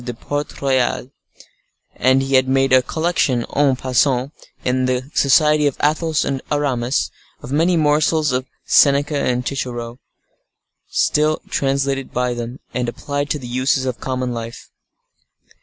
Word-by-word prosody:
de 120 Hz, -1 st, -5 dB
Port 145 Hz, +4 st, -5 dB
Royal; 130 Hz, -1 st, 0 dB, 0.8 s
and 130 Hz, +1 st, +3 dB
he 135 Hz, 0 st, -3 dB
had 130 Hz, 0 st, +4 dB
made 135 Hz, 0 st, +2 dB
a 130 Hz, -, +7 dB
collection, 160 Hz, -5 st, 0 dB
en 140 Hz, -2 st, +3 dB
passant, 130 Hz, +1 st, +1 dB, 0.3 s
in 130 Hz, 0 st, +1 dB
the 130 Hz, +2 st, -2 dB
society 150 Hz, +2 st, +4 dB
of 140 Hz, -, -2 dB
Athos 155 Hz, +1 st, +1 dB
and 135 Hz, -1 st, -2 dB
Aramis, 135 Hz, -3 st, 0 dB, 0.3 s
of 125 Hz, -, -8 dB
many 165 Hz, +4 st, +2 dB
morsels 155 Hz, 0 st, +2 dB
of 130 Hz, +1 st, -2 dB, 0.2 s
Seneca 145 Hz, +1 st, +4 dB
and 125 Hz, -2 st, -1 dB
Cicero, 120 Hz, -3 st, -4 dB, 1.5 s
translated 135 Hz, -1 st, -1 dB
by 125 Hz, 0 st, -1 dB
them, 120 Hz, +2 st, -6 dB
and 125 Hz, -1 st, -1 dB
applied 145 Hz, +4 st, -4 dB
to 150 Hz, -, 0 dB
the 130 Hz, -, -9 dB
uses 130 Hz, +2 st, 0 dB
of 125 Hz, -2 st, -3 dB
common 130 Hz, -1 st, -3 dB
life. 115 Hz, 0 st, -8 dB
135 Hz, 140 wpm, -19 LUFS, 125-145 Hz, 1.5 s, a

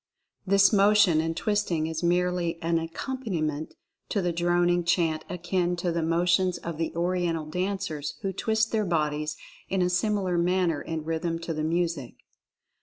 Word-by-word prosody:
This 200 Hz, +2 st, +5 dB
motion 200 Hz, -5 st, +5 dB
and 165 Hz, +1 st, -3 dB
twisting 205 Hz, -7 st, 0 dB
is 160 Hz, 0 st, -3 dB
merely 175 Hz, -1 st, +1 dB
an 165 Hz, 0 st, +2 dB
accompaniment 165 Hz, -, -3 dB, 0.3 s
to 205 Hz, -, 0 dB
the 175 Hz, -2 st, 0 dB
droning 175 Hz, +1 st, +2 dB
chant 165 Hz, -2 st, +1 dB
akin 180 Hz, 0 st, -1 dB
to 175 Hz, 0 st, -1 dB
the 170 Hz, 0 st, -1 dB
motions 175 Hz, +2 st, +2 dB
of 165 Hz, -2 st, -6 dB
the 165 Hz, -, -1 dB
Oriental 170 Hz, -2 st, 0 dB
dancers 180 Hz, -3 st, -3 dB
who 195 Hz, -1 st, -1 dB
twist 220 Hz, +3 st, 0 dB
their 220 Hz, -1 st, +1 dB
bodies 150 Hz, -4 st, -1 dB, 0.3 s
in 190 Hz, -1 st, +1 dB
a 180 Hz, -, +1 dB
similar 185 Hz, -1 st, +1 dB
manner 175 Hz, -3 st, +1 dB
in 160 Hz, -1 st, -4 dB
rhythm 165 Hz, +1 st, -1 dB
to 165 Hz, 0 st, -3 dB
the 155 Hz, -, -3 dB
music. 165 Hz, -5 st, -1 dB
175 Hz, 155 wpm, -27 LUFS, 165-185 Hz, 0.3 s, This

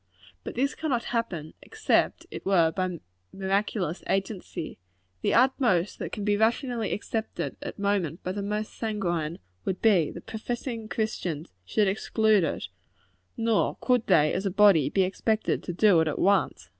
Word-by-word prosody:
But -, -, -6 dB
this 275 Hz, +4 st, +1 dB
cannot 265 Hz, -7 st, -1 dB
happen, 190 Hz, -10 st, -3 dB
except 440 Hz, -1 st, 0 dB
it -, -, -7 dB
were 170 Hz, -4 st, +3 dB
by 180 Hz, 0 st, -2 dB, 0.3 s
miraculous 195 Hz, -2 st, -1 dB
agency. 195 Hz, -, -3 dB, 0.4 s
The -, -, +1 dB
utmost 235 Hz, -7 st, +2 dB
that -, -, -4 dB
can 205 Hz, -, -4 dB
be 205 Hz, -1 st, +2 dB
rationally 230 Hz, 0 st, +1 dB
expected 220 Hz, +1 st, -3 dB
at -, -, -6 dB
present 200 Hz, -6 st, -1 dB
by 185 Hz, -, -2 dB
the 200 Hz, +2 st, -3 dB
most 210 Hz, +2 st, -3 dB
sanguine, 175 Hz, -8 st, -2 dB, 0.3 s
would 190 Hz, -1 st, -2 dB
be, 190 Hz, -9 st, +4 dB
that 170 Hz, -, -10 dB
professing 230 Hz, 0 st, -4 dB
Christians 180 Hz, -9 st, -3 dB
should 210 Hz, -, +2 dB
exclude 215 Hz, 0 st, +2 dB
it; 160 Hz, -, -2 dB, 0.7 s
nor 230 Hz, -2 st, +1 dB
could 250 Hz, -3 st, +1 dB
they, 155 Hz, -5 st, +4 dB
as 195 Hz, -, -1 dB
a -, -, +1 dB
body, 190 Hz, -7 st, +5 dB
be 190 Hz, +5 st, +2 dB
expected 215 Hz, +4 st, 0 dB
to -, -, -3 dB
do 180 Hz, 0 st, +5 dB
it 160 Hz, -, +1 dB
at 150 Hz, -, -2 dB
once. 200 Hz, +1 st, +1 dB
200 Hz, 155 wpm, -27 LUFS, 180-220 Hz, 0.7 s, body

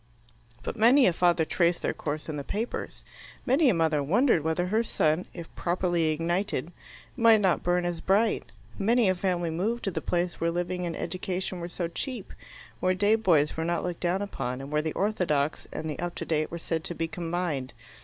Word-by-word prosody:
But -, -, -4 dB
many 245 Hz, +5 st, +6 dB
a 180 Hz, -, +4 dB
father 170 Hz, -1 st, +3 dB
traced 170 Hz, +1 st, +1 dB
their -, -, 0 dB
course 150 Hz, 0 st, -4 dB
in 155 Hz, -, -4 dB
the 145 Hz, -, -4 dB
papers; 220 Hz, -, -4 dB, 0.4 s
many 270 Hz, +3 st, +4 dB
a -, -, +4 dB
mother 160 Hz, -3 st, +2 dB
wondered 185 Hz, -, +3 dB
whether 160 Hz, +3 st, 0 dB
her 215 Hz, +5 st, +1 dB
son, 160 Hz, -6 st, 0 dB
if 170 Hz, -2 st, -9 dB
properly 175 Hz, -1 st, 0 dB
ignited, 170 Hz, +1 st, -1 dB, 0.4 s
might 230 Hz, -3 st, +6 dB
not 190 Hz, -4 st, +2 dB
burn 175 Hz, 0 st, +1 dB
as 175 Hz, -2 st, -2 dB
bright; 210 Hz, +3 st, +2 dB, 0.3 s
many 225 Hz, 0 st, +3 dB
a -, -, +4 dB
family 180 Hz, -2 st, -1 dB
moved 215 Hz, +9 st, -1 dB
to 195 Hz, -, -1 dB
the 160 Hz, -, -3 dB
place 175 Hz, +3 st, -1 dB
where 165 Hz, -, +2 dB
living 175 Hz, +1 st, -2 dB
and 165 Hz, -, -4 dB
education 185 Hz, 0 st, -3 dB
were 170 Hz, 0 st, -5 dB
so 175 Hz, -1 st, -3 dB
cheap, 225 Hz, +5 st, -5 dB, 0.5 s
where 185 Hz, 0 st, +2 dB
day 205 Hz, +3 st, +3 dB
boys 170 Hz, -10 st, +3 dB
were 160 Hz, -, -2 dB
not 170 Hz, 0 st, -1 dB
looked 180 Hz, -2 st, -3 dB
down 185 Hz, +3 st, 0 dB
upon, 125 Hz, -10 st, -4 dB
and 135 Hz, +2 st, -8 dB
where 150 Hz, 0 st, +2 dB
the 155 Hz, 0 st, -3 dB
orthodox 165 Hz, -8 st, 0 dB
and 160 Hz, -, -4 dB
the 150 Hz, -, -4 dB
up 175 Hz, 0 st, -3 dB
to -, -, -4 dB
date 155 Hz, -1 st, 0 dB
were 170 Hz, -, -5 dB
said 165 Hz, -1 st, -3 dB
to 175 Hz, -, -4 dB
be 165 Hz, -, -1 dB
combined. 165 Hz, -5 st, -3 dB
175 Hz, 205 wpm, -27 LUFS, 160-195 Hz, 0.5 s, many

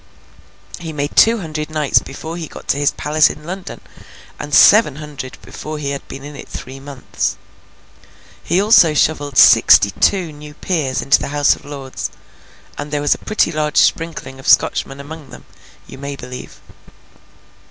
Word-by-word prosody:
He 165 Hz, -2 st, -6 dB
made 145 Hz, -1 st, -4 dB
two 230 Hz, +1 st, +5 dB
hundred 155 Hz, -2 st, -5 dB
knights 155 Hz, -3 st, +2 dB
before 160 Hz, +4 st, -8 dB
he 170 Hz, -2 st, -6 dB
got -, -, -12 dB
to -, -, +2 dB
his 145 Hz, 0 st, +2 dB
palace 155 Hz, +1 st, +2 dB
in 150 Hz, -, -9 dB
London, 185 Hz, +3 st, -7 dB, 0.6 s
and 145 Hz, -, -7 dB
seven 205 Hz, -3 st, +6 dB
hundred 145 Hz, -4 st, -8 dB
before 155 Hz, 0 st, -7 dB
he 140 Hz, -2 st, -3 dB
had 140 Hz, -, -6 dB
been 135 Hz, -, -9 dB
in 145 Hz, 0 st, -9 dB
it -, -, -11 dB
three 130 Hz, +1 st, -8 dB
months. 135 Hz, -1 st, -4 dB, 1.1 s
He 175 Hz, +3 st, +1 dB
also 195 Hz, -7 st, +5 dB
shovelled 145 Hz, -2 st, 0 dB
sixty 100 Hz, -, +7 dB
two 180 Hz, -, +1 dB
new 150 Hz, 0 st, -12 dB
peers 150 Hz, -9 st, -2 dB
into 135 Hz, -, +4 dB
the -, -, -4 dB
House 145 Hz, 0 st, +2 dB
of -, -, -17 dB
Lords—and 145 Hz, +1 st, -10 dB
there 150 Hz, 0 st, -2 dB
was 145 Hz, 0 st, +2 dB
a -, -, -9 dB
pretty 215 Hz, -5 st, 0 dB
large 150 Hz, -1 st, -2 dB
sprinkling 160 Hz, -5 st, 0 dB
of 135 Hz, -, -10 dB
Scotchmen 135 Hz, +1 st, +2 dB
among 150 Hz, 0 st, -10 dB
them, -, -, -13 dB, 0.4 s
you 135 Hz, -, -12 dB
may 140 Hz, 0 st, -5 dB
believe. 125 Hz, -1 st, -10 dB
150 Hz, 165 wpm, -17 LUFS, 140-160 Hz, 1.1 s, sixty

